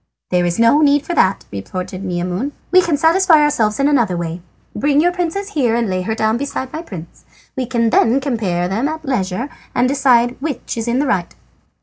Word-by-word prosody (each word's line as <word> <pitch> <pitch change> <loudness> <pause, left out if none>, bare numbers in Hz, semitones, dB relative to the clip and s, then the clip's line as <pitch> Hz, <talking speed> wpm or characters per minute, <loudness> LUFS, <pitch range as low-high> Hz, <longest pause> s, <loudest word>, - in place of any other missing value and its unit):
"There 180 -1 +2
is 170 - -2
no 230 +6 +4
need 290 -1 +3
for 345 - -3
that," 190 - +2
retorted 185 - -6
Maimoune; 180 +8 -3 0.2
"we 370 0 +6
can 335 -4 0
satisfy 330 +1 +4
ourselves 230 -8 +1
in 275 - +3
another 235 -11 +2
way. 170 0 -4 0.3
Bring 285 +6 +2
your 350 +3 +3
princess 360 +3 -3
here 255 - +1
and 235 -1 0
lay 185 -1 -1
her 220 +4 -2
down 220 +1 +1
beside 265 -1 -4
my 315 - -4
prince. 175 - -10 0.3
We 255 -2 -2
can 230 -2 +1
then 235 +4 +3
compare 210 -10 -1
them 220 +9 -1
at 315 0 -5
leisure, 205 -3 -2 0.3
and 245 +1 +3
decide 255 -3 +2
which 285 -4 -4
is 230 0 -4
in 235 +1 +1
the 285 - +1
right." 190 -9 -1
245 Hz, 205 wpm, -18 LUFS, 190-290 Hz, 0.3 s, we